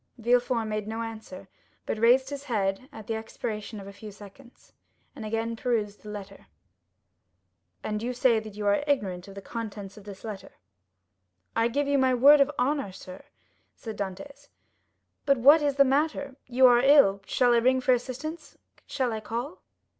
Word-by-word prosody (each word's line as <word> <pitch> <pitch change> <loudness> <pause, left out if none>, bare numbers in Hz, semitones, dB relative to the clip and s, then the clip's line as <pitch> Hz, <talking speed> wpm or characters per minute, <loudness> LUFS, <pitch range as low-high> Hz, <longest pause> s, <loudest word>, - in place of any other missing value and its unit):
Villefort 240 0 +1
made 215 -1 -3
no 225 +1 -4
answer, 220 -4 -9 0.4
but 220 - -3
raised 255 +4 +4
his 285 0 -6
head 210 0 -2
at 220 -5 -11
the 225 - -3
expiration 220 -1 -5
of 195 - -10
a 200 - -10
few 210 +1 -10
seconds, 205 +6 -16 0.4
and 240 - -8
again 225 +1 -2
perused 220 -4 -2
the 210 - -10
letter. 200 -1 -9 1.4
"And 210 0 -3
you 240 +2 -2
say 245 -2 +2
that 215 -2 -10
you 210 0 -5
are 205 +7 +2
ignorant 195 -10 -1
of 195 - -12
the 200 - -9
contents 210 -3 -7
of 205 - -13
this 200 -2 -10
letter?" 215 -4 -8 1.0
"I 230 0 +3
give 280 +4 -1
you 280 -1 +2
my 260 -1 +3
word 280 +4 +7
of 275 - +4
honor, 270 -4 0
sir," 185 0 -11 0.5
said 220 -3 -8
Dantès; 205 +9 -7 0.8
"but 275 -1 +4
what 285 +6 +6
is 285 -2 0
the 275 0 +5
matter? 280 0 0
You 255 +1 +4
are 245 -1 +7
ill—shall 245 -3 +4
I - - +4
ring 255 +2 +3
for 255 0 +3
assistance?—shall 260 -1 -5
I 220 - -3
call?" 240 - -5
230 Hz, 170 wpm, -27 LUFS, 210-265 Hz, 1.4 s, word